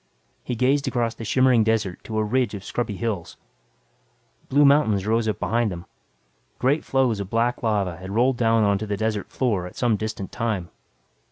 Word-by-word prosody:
He 125 - -3
gazed 135 +4 +1
across 120 -2 0
the - - -9
shimmering 130 0 +3
desert 110 -4 -1
to 110 - -4
a 110 - +2
ridge 120 0 0
of 100 - -8
scrubby 110 0 -3
hills. 105 -6 -4 1.1
Blue 145 +2 +5
mountains 125 -9 +3
rose 110 +1 +1
up 105 - -1
beyond 110 +2 0
them. 85 -1 -7 0.7
Great 140 +5 +1
floes 130 -5 +1
of 100 -2 -5
black 115 +2 0
lava 100 -6 0
had 95 +1 -9
rolled 120 +5 +2
down 115 -1 +3
onto 100 +1 +1
the 100 -1 -2
desert 110 -1 -2
floor 105 -9 -1
at - - -13
some 120 -4 +1
distant 110 -2 -5
time. 105 -7 -2
110 Hz, 180 wpm, -24 LUFS, 100-120 Hz, 1.1 s, Blue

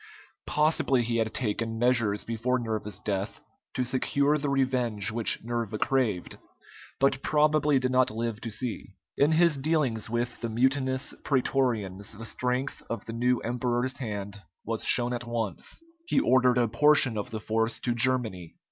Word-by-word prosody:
Possibly 150 -4 +2
he 115 0 -1
had 110 -1 0
taken 115 -1 -2
measures 115 -4 +1
before 115 +3 -1
Nerva's 110 -3 -3
death 100 0 -3 0.4
to 130 - +1
secure 140 +3 +1
the 145 -1 -1
revenge 125 -6 0
which 115 -2 +1
Nerva 115 -2 -3
craved, 115 -8 0 0.6
but 135 0 +2
probably 150 -1 +3
did 130 -1 0
not 130 0 +4
live 115 0 -3
to 115 - -4
see. 110 -3 -5 0.2
In 145 +3 +3
his 165 -2 +4
dealings 135 -7 0
with 120 +1 -2
the 115 - -2
mutinous 130 +3 0
prætorians 115 -7 0
the 115 - -7
strength 125 +4 -2
of 115 - -4
the 115 - -6
new 125 +1 +1
emperor's 125 +1 -1
hand 105 -5 -5 0.2
was 115 0 -2
shown 120 0 +2
at 120 0 -4
once. 115 - -3 0.2
He 275 - +3
ordered 130 - +4
a 120 -1 +3
portion 140 +1 +4
of 105 - -3
the 110 - -5
force 115 +1 -1
to 120 - 0
Germany. 120 -8 -1
120 Hz, 155 wpm, -28 LUFS, 110-130 Hz, 0.6 s, not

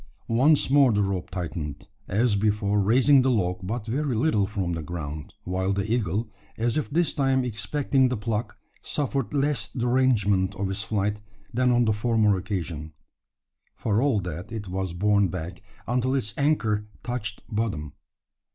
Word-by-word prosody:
Once 135 +3 +4
more 140 -3 +6
the 105 -1 +2
rope 95 -2 -2
tightened 80 -5 -5 0.2
as 110 +2 +2
before 105 0 +1
raising 130 +7 +5
the 130 - +2
log 90 -7 +1
but 105 +4 -4
very 130 +3 -1
little 110 -5 +2
from 95 -4 -2
the 80 - -3
ground 75 -2 -6
while 95 +2 -1
the 100 +3 -1
eagle, 110 -1 0 0.3
as 115 +1 0
if 155 - -1
this 165 +4 +1
time 135 -3 +2
expecting 130 +4 +1
the 125 - -1
pluck, 110 +1 -3 0.2
suffered 140 -3 -2
less 145 0 +1
derangement 115 -7 +2
of 95 0 -2
its 95 +1 -3
flight 105 -1 -1 0.3
than 125 +1 +3
on 120 0 +3
the 110 - +3
former 105 -1 +2
occasion. 90 -5 -4 0.8
For 110 0 0
all 135 -6 +2
that, 90 +2 -6
it 110 -3 -5
was 95 -1 -3
borne 100 +2 +3
back, 90 0 -6 0.3
until 125 +2 +1
its 110 -6 -1
anchor 110 -8 +1 0.2
"touched 115 -3 -4
bottom." 105 - -2
105 Hz, 160 wpm, -26 LUFS, 95-125 Hz, 0.8 s, more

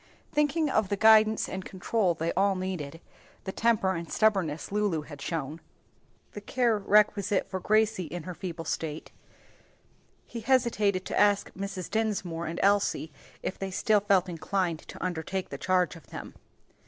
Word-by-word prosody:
Thinking 300 +2 +2
of 215 -8 +1
the 200 - 0
guidance 220 0 +5
and 190 0 -5
control 185 0 0
they 165 +1 -2
all 195 +1 +2
needed, 180 -5 -4 0.4
the 190 - -4
temper 220 -3 +2
and 170 -2 -6
stubbornness 190 -9 +1
Lulu 205 -6 0
had 145 -1 -11
shown, 155 0 -4 0.7
the - - -7
watchful 205 - -14
care 240 -4 +3
requisite 205 -1 +3
for 190 - -4
Gracie 215 -1 +2
in 170 +2 -6
her 180 - -6
feeble 170 -2 -6
state, 155 -1 -4 1.1
he 235 - -7
hesitated 220 -6 +1
to - - -1
ask 205 -1 +3
Mrs. 195 -2 -5
Dinsmore 195 -6 -1
and 165 - -4
Elsie 200 -5 +2 0.3
if - - -4
they 195 - -3
still 210 +3 +2
felt 195 -2 +2
inclined 175 -1 -1
to - - -10
undertake 180 +2 -3
the 140 - -7
charge 185 -1 +1
of 165 - -14
them. - - -8
190 Hz, 160 wpm, -28 LUFS, 170-210 Hz, 1.1 s, guidance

